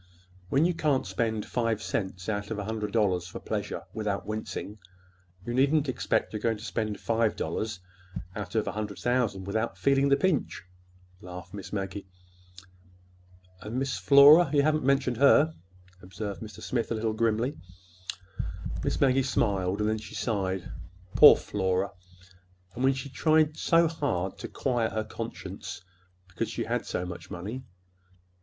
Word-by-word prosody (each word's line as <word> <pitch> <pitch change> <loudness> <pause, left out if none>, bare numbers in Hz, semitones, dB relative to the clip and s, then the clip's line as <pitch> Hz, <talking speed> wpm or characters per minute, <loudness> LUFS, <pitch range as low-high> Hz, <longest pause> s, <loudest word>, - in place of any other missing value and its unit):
When 140 - +3
you 175 - +2
can't 150 -6 +1
spend 110 +3 -1
five 115 -3 0
cents 95 -4 -3
out 100 -1 -2
of 110 - -3
a 105 - -3
hundred 105 0 -3
dollars 95 -6 +1
for - - -7
pleasure - - -4
without 105 -3 -2
wincing, 110 0 -5 0.7
you 120 - -3
needn't 140 +3 +3
expect 100 -6 0
you're 105 - -2
going 115 0 0
to 105 - -11
spend 110 -4 -2
five 115 -1 +1
dollars 110 -3 -3 0.6
out 100 -2 -6
of 110 - +1
a - - 0
hundred 105 -1 -4
thousand 120 -6 0
without 110 +4 -2
feeling 140 0 +3
the 140 - +5
pinch," 175 -3 0 0.6
laughed 90 0 -9
Miss 100 -2 -8
Maggie. 95 -1 -4 1.5
"And 110 +4 -5
Miss 135 0 -1
Flora? 145 +3 +8
You 145 -2 +4
haven't 155 0 +2
mentioned 130 -3 +2
her," 145 +4 +5 0.5
observed 100 +2 -6
Mr. 110 -1 -9
Smith, 120 -2 -1
a - - +1
little 110 0 -1
grimly. 115 +4 0 1.2
Miss - - -1
Maggie 135 -1 +4
smiled; 100 -6 0
then 110 +1 +1
she 110 - -10
sighed. 95 -5 -2 0.4
"Poor - - +10
Flora—and 90 +1 -5
when 135 0 +4
she 135 +1 -5
tried 155 +2 +2
so 165 +1 +4
hard 145 - -2
to - - -5
quiet 120 -4 -1
her 110 - -1
conscience 110 -4 -7 0.5
because 90 - -3
she - - -3
had - - -2
so 90 - -2
much 85 -1 -8
money! 100 +8 -5
110 Hz, 150 wpm, -28 LUFS, 95-130 Hz, 1.5 s, Poor